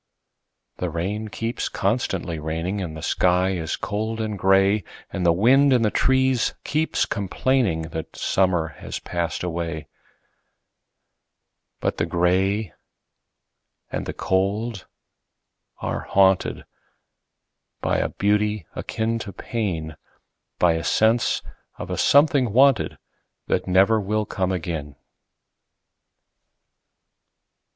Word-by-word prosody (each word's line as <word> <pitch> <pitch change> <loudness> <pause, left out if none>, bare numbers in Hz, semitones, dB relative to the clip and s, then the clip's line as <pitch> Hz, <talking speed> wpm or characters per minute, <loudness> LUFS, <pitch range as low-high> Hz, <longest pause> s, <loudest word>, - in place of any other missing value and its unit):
The 90 - -2
rain 100 +7 -3
keeps 115 +2 -3
constantly 90 -8 -1
raining, 80 +6 -3
And 80 -4 -5
the 80 - -8
sky 90 +1 +2
is 85 -4 -2
cold 110 +2 -3
and 110 -1 -2
gray, 95 +1 +3 0.3
And 95 - -2
the - - +6
wind 130 +10 +5
in 125 -3 +4
the 105 - +2
trees 130 -2 +2
keeps 155 +2 0
complainingThat 95 -7 -1
summer 90 -4 +1
has - - -5
passed 85 -1 -3 2.4
away;—But - - 0
the 80 - 0
gray 95 +3 +1 1.2
and - - -3
the - - -3
cold 100 +2 -1 1.0
are - - -3
hauntedBy 95 -1 +3 1.2
a - - +1
beauty 105 -2 0
akin 115 +1 -2
to 105 - -6
pain,—By 85 -4 -3
a 80 0 -2
sense 115 +2 +2 0.3
of - - -6
a - - -2
something 140 -6 +4
wanted, 135 -1 +4 0.5
That - - -1
never 95 +4 +4
will 105 +2 -1
come 95 -2 -1
again. 80 -5 -4
100 Hz, 100 wpm, -23 LUFS, 90-110 Hz, 2.4 s, the